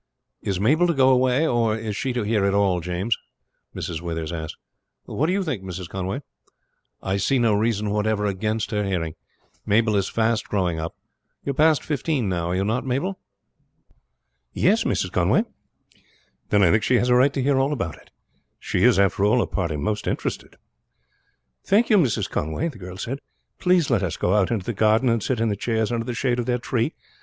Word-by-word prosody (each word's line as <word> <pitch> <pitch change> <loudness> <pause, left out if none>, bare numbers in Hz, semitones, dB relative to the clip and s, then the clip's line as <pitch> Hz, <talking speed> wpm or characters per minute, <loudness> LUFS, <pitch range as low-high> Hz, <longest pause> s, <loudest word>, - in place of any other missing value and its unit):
"Is 95 -2 -2
Mabel 150 - +3
to 170 - +1
go 130 -1 +5
away, 130 +3 +3
or 115 -6 +1
is 110 -2 -4
she 130 +5 -2
to 120 -2 -1
hear 105 -1 +1
it 100 0 +2
all, 100 -3 +2
James?" 90 +6 -1 0.6
Mrs. 80 -1 -4
Withers 80 -2 -4
asked. 80 -2 -5 0.5
"What 155 - -1
do - - +1
you 195 +1 0
think, 140 - -3
Mrs. 90 -2 -6
Conway?" 95 - -4 0.8
"I 95 +1 0
see 130 +7 +1
no 115 -3 +3
reason 105 -1 0
whatever 105 0 0
against 105 +2 -2
her 105 -1 0
hearing. 90 -5 -2 0.5
Mabel 110 +1 +2
is 100 -1 +1
fast 115 0 0
growing 90 -5 0
up. 80 +1 -5 0.5
You 140 - 0
are - - -3
past 155 +2 +3
fifteen 145 -5 -1
now, 85 -3 -1
are 90 - 0
you 95 +1 0
not, 115 +4 0
Mabel?" 140 +10 -2 1.3
"Yes, - - +2
Mrs. - - -1
Conway." - - +2 1.1
"Then 105 -1 +4
I 85 - +5
think 110 - +3
she 125 +4 +2
has 120 +1 +2
a - - +5
right 130 +3 +5
to 135 - -1
hear 135 0 +2
all 135 +2 +1
about 115 - -3
it. - - -20 0.5
She - - -1
is, - - +5
after 100 0 +2
all, 105 +4 +4
the 120 - +2
party 85 -6 -2
most 105 +7 -2
interested." - - -3 1.1
"Thank 220 +4 +3
you, 210 - +6
Mrs. 130 - +1
Conway," 80 - -2
the 130 - -12
girl 90 0 -8
said. 135 +7 -4 0.4
"Please 180 -5 +2
let 115 -6 +3
us 90 -5 -2
go 90 - +1
out 105 -3 +3
into 110 -6 -2
the 120 - -2
garden 110 +4 +3
and 115 -1 +1
sit 125 +1 -1
in 115 0 +1
the 100 - 0
chairs 110 +1 -1
under 115 -1 -1
the 120 - -4
shade 125 -1 0
of 120 - -2
that 125 0 -1
tree. 115 -3 -1
110 Hz, 205 wpm, -23 LUFS, 95-130 Hz, 1.3 s, you